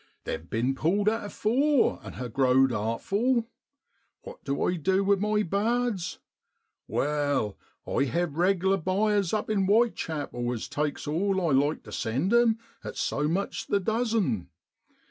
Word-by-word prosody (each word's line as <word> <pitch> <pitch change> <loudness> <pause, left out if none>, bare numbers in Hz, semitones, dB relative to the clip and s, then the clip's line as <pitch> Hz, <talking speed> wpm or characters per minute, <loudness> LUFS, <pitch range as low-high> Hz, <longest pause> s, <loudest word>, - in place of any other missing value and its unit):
'They've 80 +1 -5
bin 120 +4 0
pulled 185 +9 0
at 225 +2 +2
afore, 260 +7 +2
and - - -9
ha' 125 - -4
growed 130 0 +4
artful. 205 - 0 0.8
What - - -11
du 140 0 -1
I 180 - +1
du 190 +5 +1
with 200 0 +3
my 210 +1 +1
bards? 210 0 -1 0.7
Wai, 145 -7 0 0.3
I - - +1
hev 170 +1 -1
reg'lar 190 +2 +2
buyers 195 +1 +1
up 215 -1 -1
in 200 -3 +1
Whitechapel 160 - 0
as 115 - -5
takes 150 0 -2
all 190 +6 0
I 170 -4 0
like 145 +3 +2
to - - -12
send 135 - -1
'em, 235 -2 +4 0.3
at - - -7
so 145 +1 0
much 185 +6 -2
the 200 - +2
dozen. 215 - 0
185 Hz, 145 wpm, -27 LUFS, 140-210 Hz, 0.8 s, growed